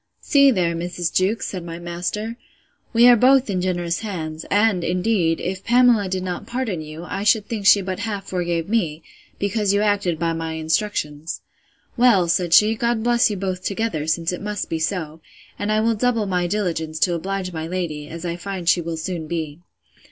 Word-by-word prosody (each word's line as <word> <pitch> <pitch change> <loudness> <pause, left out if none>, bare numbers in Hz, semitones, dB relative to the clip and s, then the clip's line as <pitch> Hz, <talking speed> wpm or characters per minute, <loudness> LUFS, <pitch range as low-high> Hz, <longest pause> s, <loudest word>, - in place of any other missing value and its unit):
See 280 -1 +5
there, 180 -9 +1
Mrs. 175 0 -3
Jewkes, 195 +5 +1
said 185 -3 -5
my 165 -1 -7
master, 175 +6 -4 0.6
we 235 +1 +6
are 245 - +8
both 255 0 +4
in 185 -2 -1
generous 175 -2 -1
hands; 160 -7 -5
and 205 -3 +2
indeed, 180 -2 +1
if 185 +1 -4
Pamela 240 -4 +4
did 185 0 -2
not 180 -1 -5
pardon 235 -9 -2
you, 155 +2 -8
I 200 - -3
should 210 0 +3
think 210 -4 -2
she 200 0 +7
but 185 0 -4
half 205 -2 -4
forgave 170 -2 -2
me, 170 -8 -1 0.3
because 200 0 0
you 205 - +2
acted 200 -5 +1
by 165 0 0
my 165 0 -4
instructions.—Well, 165 - -1
said 175 0 +1
she, 210 +5 +6
God 235 0 -1
bless 240 -1 +3
you 205 - -3
both 185 -1 -3
together, 200 -7 -2
since 165 +2 0
it 180 - -5
must 210 -1 -4
be 165 - -1
so; 160 -2 -3 0.4
and 205 +1 -1
I 215 0 +2
will 230 +1 +2
double 230 -1 +1
my 180 -2 0
diligence 170 -5 -2
to 180 - +3
oblige 185 +2 -3
my 160 0 -4
lady, 165 -5 -4
as 165 +1 -7
I 170 0 -3
find 185 -1 -6
she 175 - +4
will 165 0 -4
soon 165 -1 -4
be. 160 -2 -4
185 Hz, 190 wpm, -22 LUFS, 170-210 Hz, 0.6 s, are